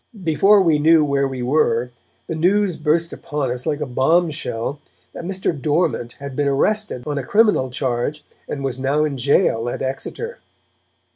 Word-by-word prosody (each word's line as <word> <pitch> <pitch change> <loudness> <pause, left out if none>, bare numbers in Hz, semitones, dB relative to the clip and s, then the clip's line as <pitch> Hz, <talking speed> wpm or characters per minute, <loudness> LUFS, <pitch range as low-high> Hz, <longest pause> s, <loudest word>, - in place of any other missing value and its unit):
Before 180 +6 +4
we 160 -4 +3
knew 160 0 +5
where 140 -1 +1
we 130 -2 -5
were, 125 -3 +1 0.3
the - - -4
news 185 +3 +2
burst 165 +2 0
upon 145 -4 -3
us, 125 +4 -5
like 150 -1 -1
a - - 0
bomb 160 +7 +2
shell, 140 -2 -4 0.3
that - - -7
Mr. 190 0 -1
Dormant 145 -4 0
had 140 -1 -8
been 145 +1 0
arrested 175 - 0
on 145 -1 -2
a - - -4
criminal 205 - +3
charge 125 +3 -2 0.2
and 140 - -4
was 130 -1 -3
now 140 +3 +1
in 145 -2 -2
jail 125 -3 +2
at - - -4
Exeter. 295 - -5
145 Hz, 170 wpm, -20 LUFS, 130-165 Hz, 0.3 s, knew